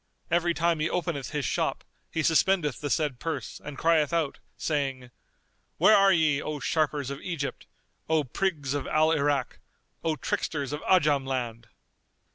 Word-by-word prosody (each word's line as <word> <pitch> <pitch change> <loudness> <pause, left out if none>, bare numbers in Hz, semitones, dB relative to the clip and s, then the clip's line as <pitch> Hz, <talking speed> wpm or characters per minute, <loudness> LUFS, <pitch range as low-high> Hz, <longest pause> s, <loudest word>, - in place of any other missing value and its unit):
Every 170 0 +2
time 170 -1 +1
he 155 +2 0
openeth 170 -6 -2
his 150 -3 -2
shop - - -1 0.3
he 160 - -1
suspendeth 160 - +2
the 145 - -2
said 145 -4 0
purse 165 0 -4
and 150 -2 -7
crieth 160 -2 +3
out, 165 -4 -1 0.2
saying, 135 -5 -2 0.7
'Where 215 - +6
are 195 0 +6
ye, 155 -4 +3
O 155 -1 -4
sharpers 145 -3 0
of 140 - -6
Egypt, 160 -6 -4 0.4
O 160 -1 +3
prigs 145 -1 -2
of 145 -2 -2
Al 155 +1 +3
Irak, 145 -4 0 0.4
O 160 -1 +1
tricksters 145 -2 -2
of 150 - -4
Ajam 150 -7 +3
land? 120 -3 -3
150 Hz, 155 wpm, -27 LUFS, 140-165 Hz, 0.7 s, Where